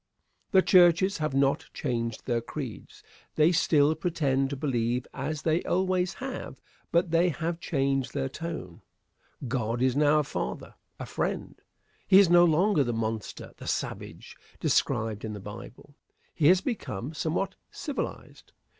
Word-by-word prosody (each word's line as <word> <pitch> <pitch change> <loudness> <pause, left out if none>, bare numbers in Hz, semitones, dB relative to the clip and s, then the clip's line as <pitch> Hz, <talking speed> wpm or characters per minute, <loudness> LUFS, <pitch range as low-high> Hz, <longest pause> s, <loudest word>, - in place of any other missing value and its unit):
The 190 -3 +5
churches 180 +1 +5
have 155 -3 -1
not 135 0 +2
changed 115 -4 -3
their 120 -2 0
creeds. 125 -2 -8 0.3
They 155 +2 +5
still 155 -3 +3
pretend 145 -5 0
to 140 - -3
believe 125 -3 -1
as 150 +3 -4
they 160 +1 +2
always 185 0 0
have 265 0 -6 0.3
but 170 0 +2
they 170 +2 +4
have 170 +1 -3
changed 135 -5 -1
their - - 0
tone. 140 - -7 0.7
God 120 -2 -1
is 130 0 +2
now 150 +1 +4
a 150 - +3
father 65 - -5 0.3
a - - -5
friend. - - -3 0.5
He 190 - +7
is 195 -4 +6
no 175 0 +7
longer 170 0 +3
the 120 -2 -2
monster, 110 -1 -4
the - - -10
savage, - - -4 0.2
described 110 -1 0
in 110 -1 -4
the 105 - -6
Bible. 105 +7 -10 0.4
He 150 -3 +2
has 180 +2 +6
become 150 - -4
somewhat 165 +5 -2 0.2
civilized. 290 -3 -6
150 Hz, 145 wpm, -28 LUFS, 125-175 Hz, 0.7 s, He